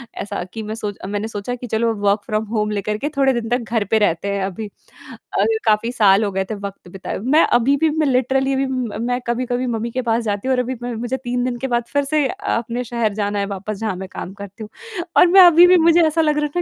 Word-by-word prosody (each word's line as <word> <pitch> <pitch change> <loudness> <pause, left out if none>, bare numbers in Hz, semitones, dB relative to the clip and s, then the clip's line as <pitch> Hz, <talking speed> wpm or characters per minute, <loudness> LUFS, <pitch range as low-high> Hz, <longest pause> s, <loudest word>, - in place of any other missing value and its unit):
ऐसा 200 -2 -4
कि 220 -1 -5
मैं 215 +1 -5
सोच 210 -3 -5
मैंने 205 +2 -3
सोचा 225 +3 -4
कि 245 0 -8
चलो 225 +1 0
वर्क 205 +1 +2
फ्रॉम 215 +1 -1
होम 210 0 0
लेकर 210 +1 -2
के 290 +6 -3
थोड़े 270 -1 +3
दिन 225 0 -6
तक 240 -2 -1
घर 220 -3 +1
पे 220 - +4
रहते 200 -1 +1
हैं 195 - -1
अभी 200 +3 -5 0.7
अ, - - +3 0.2
काफ़ी 215 +2 +2
साल 205 -3 +4
हो 200 - -1
गए 190 0 -1
थे - - -2
वक़्त 200 -2 -8
बिताए। 190 +1 -6
मैं 280 +9 +4
अभी 275 +4 +2
भी 320 +1 +2
मैं 300 - +2
लिटरली 265 +1 +1
अभी 270 0 +1
म 250 -5 -3
मैं 245 0 0
कभी-कभी 245 +1 -1
मम्मी 230 0 -2
के 255 - -2
पास 230 -1 0
जाती 205 +3 -2
हूँ 265 - +3
और - - 0
अभी 250 +1 -2
मैं 245 -1 -3
मुझे 245 +3 -3
3 245 -1 -2
दिन 250 -1 -2
के 265 - -2
बाद 240 -1 0
फिर 285 - +2
से 300 0 +1
अ, - - -4 0.2
अपने 240 +1 -3
शहर 230 -3 -1
जाना 205 0 -2
है 200 - 0
वापस 200 +1 -5
जहाँ 215 -4 -2
मैं 190 +1 -7
काम 190 - -7
करती 200 +2 -10
हूँ। 210 - -9 0.5
और 360 - +7
मैं 380 +2 +7
अभी 350 0 +8
भी 365 0 +6
मुझे 335 +1 +5
ऐसा 325 +1 +1
लग 300 -1 +2
रहा 300 - +1
है 350 - +1
230 Hz, 265 wpm, -20 LUFS, 205-260 Hz, 0.7 s, अभी